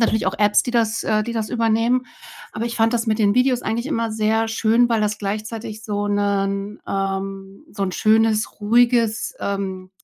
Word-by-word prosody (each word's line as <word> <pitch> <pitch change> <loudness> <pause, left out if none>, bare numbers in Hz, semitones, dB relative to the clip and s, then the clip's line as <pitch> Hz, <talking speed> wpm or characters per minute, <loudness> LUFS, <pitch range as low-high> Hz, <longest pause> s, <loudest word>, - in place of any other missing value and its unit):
natürlich 220 -2 +1
auch 190 - 0
Apps, 210 -1 +4
die 245 - -4
das 230 -1 +1
äh, 215 -1 +1
die 235 - -4
das 220 -2 -3
übernehmen. 230 +2 +1 0.5
Aber 215 +2 -3
ich 235 - -4
fand 225 +1 +2
das 230 0 0
mit 215 0 +1
den 205 -1 +3
Videos 250 -1 +2
eigentlich 235 +4 -2
immer 230 -6 -1
sehr 220 +1 +1
schön, 230 +2 +2
weil 230 -2 +1
das 210 0 -1
gleichzeitig 215 +2 -5
so 205 -1 -2
'nen 200 0 -1
ähm, 195 0 -4
so 200 -1 -4
'n 185 - -3
schönes, 220 0 +2
ruhiges, 235 0 +2
ähm, 190 -2 -4
220 Hz, 185 wpm, -21 LUFS, 205-230 Hz, 0.5 s, Apps